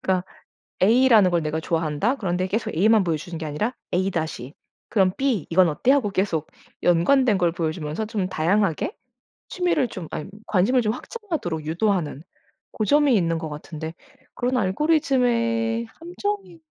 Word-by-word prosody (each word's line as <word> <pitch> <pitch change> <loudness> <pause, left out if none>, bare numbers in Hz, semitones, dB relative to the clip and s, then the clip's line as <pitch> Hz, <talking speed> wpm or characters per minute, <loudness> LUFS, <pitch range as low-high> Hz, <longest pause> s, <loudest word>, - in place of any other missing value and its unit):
그니까 185 -1 0 0.6
A라는 225 -3 +5
걸 170 -2 +1
내가 155 +1 -2
좋아한다. 165 - 0
그런데 185 -4 -1
계속 215 -1 -2
A만 210 +3 +4
보여 165 -2 0
주는 165 +2 -7
게 160 - -5
아니라 210 - -2 0.2
A 190 +2 +1
다시 155 -6 -4 0.3
그럼 190 -4 +2
B 260 - 0
이건 175 +1 +5
어때? 160 - +1
하고 245 -8 +2
계속 180 -6 -1 0.3
연관된 200 +6 +3
걸 175 -3 +2
보여주면서 160 +3 -3
좀 200 -4 -2
다양하게 185 - 0 0.5
취미를 350 -8 0
좀 180 -6 -7
아님 150 - -6 0.2
관심을 225 +6 +2
좀 215 0 +1
확장하도록 255 - -5
유도하는 170 -4 -1 0.5
고점이 285 +4 +3
있는 165 -3 +1
것 160 -1 -5
같은데 160 +2 -7 0.4
그런 250 +1 -1
알고리즘의 230 - +1
함정이 355 - -5
195 Hz, 335 characters per minute, -23 LUFS, 165-245 Hz, 0.6 s, A라는